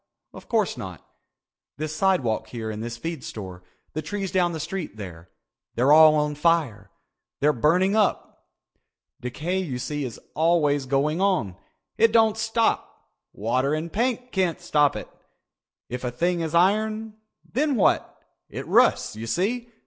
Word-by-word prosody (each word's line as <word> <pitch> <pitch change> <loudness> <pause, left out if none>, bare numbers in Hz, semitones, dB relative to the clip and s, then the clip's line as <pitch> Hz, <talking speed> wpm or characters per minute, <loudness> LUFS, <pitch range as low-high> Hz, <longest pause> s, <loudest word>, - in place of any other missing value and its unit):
Of - - -13
course - - +1
not. - - -8 0.7
This 155 +1 -4
sidewalk 155 - +1
here 115 -2 -5
and 105 0 -6
this 120 +1 -5
feed 165 0 -5
store, 95 -5 -8 0.3
the 155 - -2
trees 195 +4 -4
down 180 -2 +2
the 160 - -5
street 175 - -5
there—they're 95 - -4
all 155 0 +8
on 150 0 +1
fire. 150 -7 0 0.5
They're 150 +2 +3
burning 180 - +2
up. 215 -3 -1 0.7
Decay 155 +10 -2
you 150 -10 -3
see 145 +3 -3
is 125 -4 -6
always 150 -4 +2
going 145 +6 +1
on. 180 - +1 0.4
It 230 0 +5
doesn't 225 -1 +4
stop. 225 +1 -1 0.2
Water 130 +7 0
and 160 +2 -5
paint 250 +2 -1
can't 185 -4 0
stop 145 -2 +2
it. - - -6 0.8
If 125 +1 -6
a 125 - -1
thing 175 +9 0
is 165 0 -2
iron, 215 +4 +2 0.4
then 285 +2 +1
what? 210 - +1 0.3
It - - -6
rusts, - - +3
you 115 +1 -6
see. 225 - -1
155 Hz, 150 wpm, -24 LUFS, 125-190 Hz, 0.8 s, all